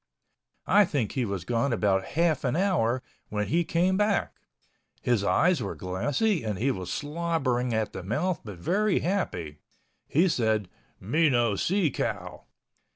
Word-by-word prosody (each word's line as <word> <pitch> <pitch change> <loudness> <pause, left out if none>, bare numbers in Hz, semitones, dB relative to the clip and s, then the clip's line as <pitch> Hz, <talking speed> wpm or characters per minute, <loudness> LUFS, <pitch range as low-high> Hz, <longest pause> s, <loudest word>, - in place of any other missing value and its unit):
I 205 - +6
think 140 - -1
he 130 -3 -1
was 100 -4 -4
gone 120 +5 0
about 100 -4 +2
half 170 -2 +2
an 125 -1 0
hour 155 - +1 0.3
when 105 0 -2
he 170 +2 +2
came 180 +3 +1
back. 210 0 +1 0.7
His 120 -5 +1
eyes 165 - +3
were 100 - -4
glassy 145 - 0
and 105 -3 -2
he 135 +7 +1
was 95 -6 -5
slobbering 145 -6 -1
at 110 -2 -1
the - - -5
mouth 150 - -1
but 105 -4 -8
very 200 - +1
happy. 85 - -2 0.5
He 170 +6 +3
said. 110 - 0 0.3
"Me 150 - +2
no 120 -5 +2
see 180 - +1
cow." - - -4
130 Hz, 155 wpm, -27 LUFS, 105-170 Hz, 0.7 s, I